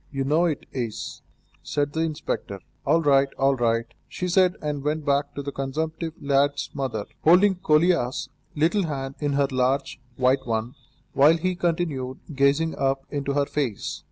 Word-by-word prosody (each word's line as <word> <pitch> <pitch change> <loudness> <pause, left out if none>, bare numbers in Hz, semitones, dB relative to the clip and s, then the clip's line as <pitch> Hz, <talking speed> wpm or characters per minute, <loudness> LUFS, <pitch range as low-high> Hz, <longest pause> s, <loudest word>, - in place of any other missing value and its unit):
You 135 -1 -2
know 155 +6 +2
it 155 -4 -2
is," 120 -5 -4 0.4
said 145 0 -2
the 160 - -2
inspector. 155 -10 -3 0.3
"All 165 +3 +3
right, 140 -1 +4
all 135 0 +3
right," 115 -2 +1 0.2
she 180 - -4
said, 180 0 +3
and 150 -2 -3
went 150 +1 -1
back 140 0 0
to 140 - -4
the 140 - -4
consumptive 155 +4 -3
lad's 140 0 +1
mother, 125 -7 -3 0.2
holding 185 +5 +6
Kolia's 155 -6 +2 0.3
little 165 +5 +2
hand 135 -3 -4
in 145 -2 -1
her 140 0 +2
large, 130 0 0
white 130 +1 +2
one, 115 +2 -1 0.4
while 150 +4 +5
he 185 +3 0
continued 165 -7 -2 0.2
gazing 140 +4 +2
up 135 0 0
into 140 -1 -2
her 140 0 +2
face. 135 -8 -3
140 Hz, 160 wpm, -25 LUFS, 135-160 Hz, 0.4 s, holding